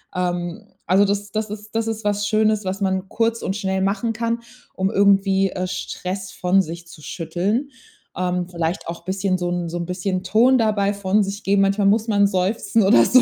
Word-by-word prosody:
Ähm, 180 +3 -3 0.2
also, 190 +2 +4
das 200 0 -2
das 215 0 -2
ist 210 0 -8
das 225 0 0
ist 220 0 -3
was 205 0 0
Schönes, 215 0 +2
was 190 +2 -3
man 190 0 -1
kurz 230 0 0
und 195 - -2
schnell 190 -2 -1
machen 210 +4 0
kann, 230 +1 -1 0.3
um 190 +1 0
irgendwie, 195 -1 +3
äh, 185 -1 -3
Stress 185 +1 -5
von 185 +2 +2
sich 170 0 -7
zu 170 -2 -13
schütteln. 185 - -2 0.5
Ähm, 180 -1 -1
vielleicht 170 +1 -3
auch 170 0 -7
bisschen 190 0 0
so 175 -1 -2
'n 175 -1 -2
so 175 - -4
'n 170 - -3
bisschen 185 +1 -2
Ton 235 +7 +4
dabei 210 -3 +2
von 200 +1 +1
sich 200 +2 -5
geben. 195 0 +3
Manchmal 195 +1 +2
muss 220 +3 +3
man 200 -1 +4
seufzen 200 +3 +1
oder 120 -12 +6
so. 255 0 +6
195 Hz, 200 wpm, -21 LUFS, 180-210 Hz, 0.5 s, oder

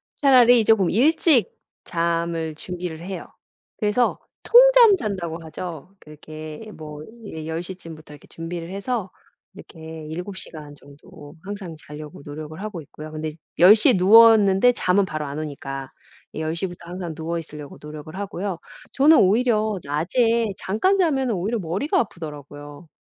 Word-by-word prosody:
차라리 245 -4 +5
쪼금 205 -5 +4
일찍 280 - +3 0.3
잠을 165 -2 -2
준비를 175 -1 -6
해요. 185 0 -7 0.5
그래서 215 +3 +1 0.2
"통잠 - - +7
잔다."고 175 - -4
하죠. 160 +1 -8
그렇게 155 +2 -10
뭐 150 -1 -9 0.2
이제 160 -5 -7
10 160 +1 -3
시쯤부터 165 -4 -10
이렇게 145 - -16
준비를 165 0 -7
해서 200 0 -3 0.4
이렇게 160 -1 -11
7 180 +5 -6
시간 150 -4 -10
정도 145 +2 -15
항상 195 -4 -7
자려고 150 -1 -10
노력을 155 +3 -8
하고 210 -6 -6
있고요. 155 +1 -11
근데 155 0 -5 0.2
10 180 +6 +8
시에 235 +4 +4
누웠는데 210 +2 +6
잠은 190 0 +2
바로 155 -4 -4
안 140 +1 -5
오니까 135 -3 -6 0.4
10 160 +1 -2
시부터 175 -1 -6
항상 175 -2 -6
누워 165 +2 -3
있으려고 150 -3 -10
노력을 150 +2 -9
하고요. 195 -2 -4 0.3
저는 300 +4 +6
오히려 215 0 +2
낮에 220 - +1
잠깐 370 - +1
자면 270 -8 +1
오히려 210 +4 -1
머리가 190 - -1
아프더라고요. 145 - -7
175 Hz, 310 characters per minute, -23 LUFS, 155-210 Hz, 0.5 s, 10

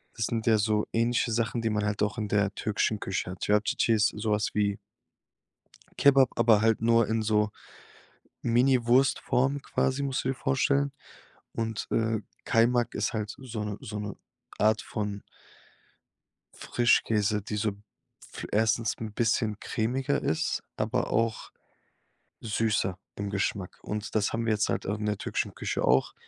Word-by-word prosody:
Das 115 -3 -1
sind 115 -1 -2
ja 110 -1 +5
so 105 0 +1
ähnliche 115 +1 +1
Sachen, 115 0 0
die 115 - +1
man 105 -1 0
halt 105 0 0
auch 105 +3 -1
in 105 - -2
der 100 -1 +1
türkischen 105 0 0
Küche 95 -2 -3
hat. 90 - -8
Cevapcici 105 +2 +2
ist 110 0 +3
so 110 +1 -1
was 105 -1 0
wie 100 -1 +1 1.2
Kebab, 135 -3 +6
aber 115 -3 +5
halt 115 0 +2
nur 115 -1 +4
in 110 0 0
so 105 -1 +2 0.9
Miniwurst-Form 130 +2 +2
quasi, 135 +2 0
musst 135 -2 -1
du - - -1
dir 135 - 0
vorstellen. 135 +2 +1 0.6
Und, 115 -1 -3
äh, 115 -1 +1 0.3
Kaymak 120 +1 +2
ist 105 - -1
halt 105 -2 -3
so 120 -5 -5
'ne 105 -1 -4
so 105 0 -6
'ne 105 -1 -5 0.4
Art 110 0 +3
von 105 -2 -4 1.3
Frischkäse, 110 -3 +2
die 105 - -4
so 105 +1 0 0.6
f - - -6
erstens 110 +2 +1
'n 110 -2 -6
bisschen 110 -2 0
cremiger 130 +5 -1
ist, 80 - -1
aber 115 +4 -1
auch 115 0 0 0.9
süßer 110 -4 0 0.2
im 100 0 -4
Geschmack. 100 -1 -2
Und 105 +1 -5
das 105 -2 +2
haben 115 +1 -1
wir 115 - +2
jetzt 105 0 0
halt, - - -1
ähm, 100 - -1
in 105 0 -4
der 105 -1 0
türkischen - - -3
Küche - - -3
auch. 65 +2 +3
110 Hz, 160 wpm, -28 LUFS, 105-120 Hz, 1.3 s, Kebab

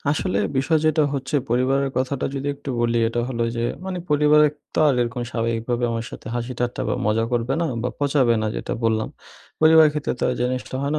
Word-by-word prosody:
আসলে 100 -9 0 0.2
বিষয় 155 +4 +2
যেটা 155 0 +3
হচ্ছে 135 +2 -2
পরিবারের 135 +3 +1
কথাটা 130 +1 -1
যদি 140 +1 -3
একটু 140 -1 -7
বলি 120 0 +1
এটা 120 +1 -1
হলো 115 -2 -1
যে, 115 - -1 0.2
মানে 185 -1 -3
পরিবারের 150 0 +5 0.2
তো - - -2
আর 140 - +3
এরকম 120 +1 -3
স্বাভাবিকভাবে 115 +1 -1
আমার 115 0 -2
সাথে - - -11
হাসি 120 +1 -3
টাট্টা 125 0 -2
বা - - +1
মজা 110 +1 +2
করবে 120 +2 0
না - - +1 0.2
বা 125 - -1
পচাবে 135 -4 +2
না, - - 0
যেটা - - -4
বললাম। 110 -1 +1 0.5
পরিবারের 160 -1 +7
ক্ষেত্রে 150 -1 -2
তো - - -7
আর - - -2
জিনিসটা 125 +1 -2
হয় 140 +1 -1
না। 155 - +1
130 Hz, 210 wpm, -22 LUFS, 120-145 Hz, 0.5 s, পরিবারের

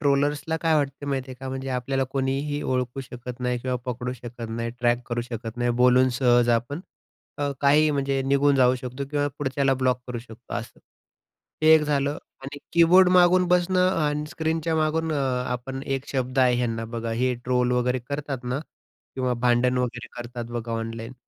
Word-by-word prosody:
ट्रोलर्सला 145 +2 +1
काय 165 -1 +2
वाटतं 145 -1 -1
माहिती 135 -1 -2
आहे 130 - -6
का? 135 - -5
म्हणजे 135 0 -4
आपल्याला 135 +2 -1
कोणीही 140 +2 -1
ओळखू 125 0 -1
शकत 125 -1 -8
नाही 125 0 0
किंवा 125 +1 -2
पकडू 125 0 -3
शकत 120 -1 -8
नाही, 115 +1 -3
ट्रॅक 120 0 +1
करू 120 -1 -1
शकत 115 -1 -5
नाही. 120 0 +1
बोलून 125 +1 +5
सहज 120 -2 +4
आपण 140 +7 -7 0.6
अ, 145 -1 -1
काहीही 150 +2 +5
म्हणजे 140 -1 0
निघून 140 +1 +3
जाऊ 130 -1 +4
शकतो 130 +2 -5
किंवा 145 -1 +1
पुढच्याला 135 -1 +1
ब्लॉक 130 -1 +1
करू 125 -1 -4
शकतो 115 0 -12
असं. - - -6 0.8
हे 160 0 +8
एक 160 - +6
झालं, 145 -1 0 0.3
आणि 140 +2 -7 0.2
कीबोर्ड 180 +2 +6
मागून 180 0 +5
बसणं 180 +1 +3
आणि 150 -1 0
स्क्रीनच्या 160 0 -1
मागून 160 +1 0
अ, - - 0 0.4
आपण 130 +2 -4
एक 135 0 -2
शब्द 130 0 -1
आहे 125 -1 +4
ह्यांना 115 -2 -1
बघा 115 0 -3
हे 130 0 +2
ट्रोल 125 0 +1
वगैरे 125 +1 +1
करतात 140 -3 -4
ना 125 +2 -2 0.6
किंवा 130 -1 0
भांडण 125 +1 +2
वगैरे 125 0 -2
करतात 120 0 -6
बघा 120 -1 -4
ऑनलाईन. 115 +1 -4
130 Hz, 180 wpm, -25 LUFS, 125-145 Hz, 0.8 s, हे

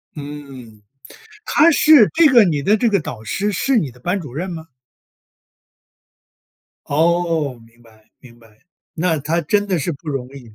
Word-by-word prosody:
嗯， 140 -7 -10 0.6
她 320 -3 +4
是 295 -7 +5
这 330 -2 +6
个 240 -5 +6
你 150 -5 -1
的 205 +6 +3
这 225 +2 +1
个 200 -3 +1
导 120 -7 -8
师 205 - -2
是 245 +7 0
你 150 - -1
的 125 - -20
班 180 +9 -2
主 145 -8 -10
任 180 +6 -4
吗？ 160 -2 -8 2.2
哦， 160 -3 0
明 115 +1 -22
白， 110 -2 -24
明 120 -2 -18
白， 110 -2 -23 0.4
那 165 -1 -1
她 160 +5 -1
真 205 +3 0
的 185 -4 -1
是 160 +4 -3
不 150 +2 -11
容 130 -3 -4
易。 125 -6 -14
155 Hz, 175 characters per minute, -18 LUFS, 125-190 Hz, 2.2 s, 这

